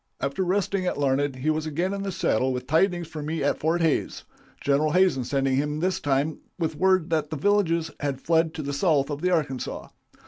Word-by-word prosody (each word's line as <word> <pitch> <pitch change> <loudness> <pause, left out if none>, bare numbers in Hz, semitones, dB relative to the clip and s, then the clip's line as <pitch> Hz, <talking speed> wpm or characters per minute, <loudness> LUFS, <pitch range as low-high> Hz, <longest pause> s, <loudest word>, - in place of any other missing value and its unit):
After 140 +7 -1
resting 190 0 0
at - - -1
Larned 140 0 +1
he 140 +5 0
was 155 0 -2
again 170 +6 -1
in 200 - -3
the 195 0 -3
saddle 130 -6 +1
with 125 0 -3
tidings 175 +3 +1
for 160 -2 -7
me 155 +1 -3
at 145 0 +1
Fort 165 +3 +1
Hays, 160 -3 0 0.4
General 145 +2 +1
Hazen 180 -8 +3
sending 135 +1 0
him 150 +2 -1
this 185 +2 0
time 145 +2 0 0.2
with 160 -3 -2
word 185 0 +2
that 155 -2 0
the 155 - -4
villages 170 -2 +1
had 140 -2 -2
fled 165 +1 +1
to 155 - -4
the 140 0 -3
south 150 -3 +2
of 145 0 -4
the 180 - +1
Arkansas. 150 -7 -2
155 Hz, 210 wpm, -25 LUFS, 140-175 Hz, 0.4 s, Hazen